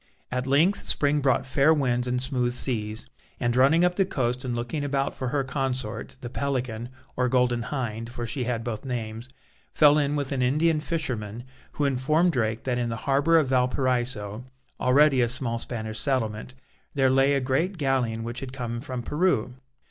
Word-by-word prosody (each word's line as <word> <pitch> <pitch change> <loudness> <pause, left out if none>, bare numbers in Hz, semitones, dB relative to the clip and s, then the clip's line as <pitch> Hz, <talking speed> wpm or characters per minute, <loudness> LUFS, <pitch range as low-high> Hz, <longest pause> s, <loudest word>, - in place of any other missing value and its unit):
At 125 +1 -2
length 160 +9 +3
spring 145 0 +2
brought 130 -1 +2
fair 140 +3 +3
winds 125 -4 0
and 125 0 0
smooth 125 -2 -1
seas, 110 -4 -1 0.3
and 120 -1 0
running 150 +7 +5
up 180 0 0
the 195 - +4
coast 125 -8 -2
and 125 -2 -2
looking 120 +5 -3
about 140 -1 -1
for 130 - -4
her 140 +2 0
consort, 130 -4 -3
the 120 - -6
Pelican 125 -4 -2 0.3
or 125 0 +1
Golden 125 -1 +2
Hind 115 -4 -4
for 120 0 -5
she 125 +2 -2
had 115 -2 -2
both 115 -3 -4
names 115 -2 -5 0.4
fell 150 0 +5
in 145 0 0
with 145 -2 -2
an 135 -2 0
Indian 155 +5 +2
fisherman, 120 -9 -3 0.3
who 145 - 0
informed 150 +6 +2
Drake 110 -5 -1
that 125 -2 -1
in 120 -1 -1
the 115 - -2
harbour 145 +4 +4
of 150 -5 +2
Valparaiso, 125 -4 0 0.4
already 135 +1 +4
a 120 - +2
small 120 -2 -1
Spanish 110 -2 -4
settlement, 125 -3 -1 0.4
there 135 -2 +3
lay 135 +2 +4
a - - +2
great 140 +9 0
galleon 130 -6 0
which 120 +2 -5
had 135 -2 -6
come 120 -3 -4
from 130 -2 -5
Peru. 150 -6 0
130 Hz, 180 wpm, -26 LUFS, 120-140 Hz, 0.4 s, running